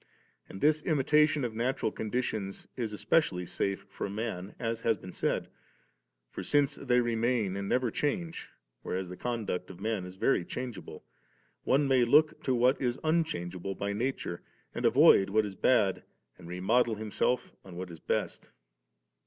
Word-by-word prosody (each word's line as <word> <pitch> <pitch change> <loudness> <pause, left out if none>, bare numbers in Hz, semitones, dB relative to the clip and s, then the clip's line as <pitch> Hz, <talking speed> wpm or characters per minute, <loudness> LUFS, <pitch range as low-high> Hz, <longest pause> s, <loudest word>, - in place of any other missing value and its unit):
And 95 - -9
this 155 +1 +3
imitation 150 -1 +3
of 115 - -3
natural 120 0 -1
conditions 110 -3 -3
is 115 -4 -3
especially 105 - +1
safe 100 +2 -2
for 100 - -5
man, 100 -2 -4
as 115 -1 -2
has 115 -2 +2
been 90 0 -10
said; - - -1 0.8
for, - - -5
since 145 -1 +2
they 125 -4 +1
remain 115 -4 0
and 100 0 -3
never 125 -2 +1
change, 165 - -2 0.3
whereas 95 0 -3
the 90 - -7
conduct 110 -6 -3
of 95 -2 -10
men 105 -3 -2
is 90 - -10
very 95 -1 +2
changeable, 100 -8 -7 0.6
one 140 +2 +3
may 130 -2 +4
look 150 +6 +4
to 130 - +2
what 125 +3 +3
is 125 -2 0
un 165 +1 +3
changeable 95 - -5
by 100 +1 -2
nature, 115 -6 -3 0.3
and - - -3
avoid 95 0 +6
what 110 +2 +2
is 100 - -5
bad 100 -1 +2 0.3
and 90 - -13
remodel 110 +7 +1
himself 110 +4 -1
on 95 -2 -11
what 90 -1 -6
is 85 - -10
best - - -2
31. - - -30
110 Hz, 165 wpm, -30 LUFS, 95-130 Hz, 0.8 s, avoid